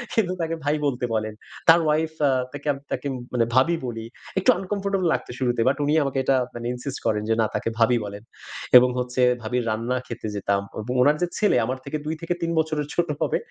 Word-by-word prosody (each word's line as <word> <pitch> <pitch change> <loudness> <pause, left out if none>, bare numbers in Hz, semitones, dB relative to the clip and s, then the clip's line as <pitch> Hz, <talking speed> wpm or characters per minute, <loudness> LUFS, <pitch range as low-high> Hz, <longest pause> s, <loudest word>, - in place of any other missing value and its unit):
কিন্তু 185 -5 +2
তাকে 165 0 -1
ভাই 145 +1 +2
বলতে 125 -3 0
বলেন। 110 -1 -1 0.4
তার 165 +1 +9
ওয়াইফ 155 +1 +1 0.2
আ - - +3 0.2
তাকে 145 +1 -4 0.2
তাকে 145 - -2 0.3
মানে 115 -2 +3
ভাবি 165 +7 +4
বলি। 115 -2 -5 0.3
একটু 190 - +1
আনকমফর্টেবল 195 -1 -1
লাগত - - -2
শুরুতে 120 -3 +1
বাট 135 - +3
উনি 145 +1 +1
আমাকে 140 -1 -2
এটা 135 0 +3 0.2
মানে 120 0 -6
insist 130 +2 -5
করেন 105 -1 +1
যে, - - +4
না - - +3
তাকে 115 +1 -2
ভাবি 120 +1 +4
বলেন। 100 0 -6 0.6
এবং 125 +1 +6
হচ্ছে 125 +1 -1 0.2
ভাবীর 120 +3 -1
রান্না 115 +4 -1
খেতে 120 -2 -6
যেতাম। 100 0 0 0.2
এবং 125 +4 -4
উনার 145 +4 +4
যে 175 - +2
ছেলে 210 -11 +3
আমার 130 +3 -2
থেকে 150 +2 -3
২ 155 - -2
থেকে 165 +1 -1
৩ 170 - -1
বছরের 155 -2 -1
ছোট 175 0 +1
হবে। - - +1
130 Hz, 210 wpm, -24 LUFS, 120-160 Hz, 0.6 s, তার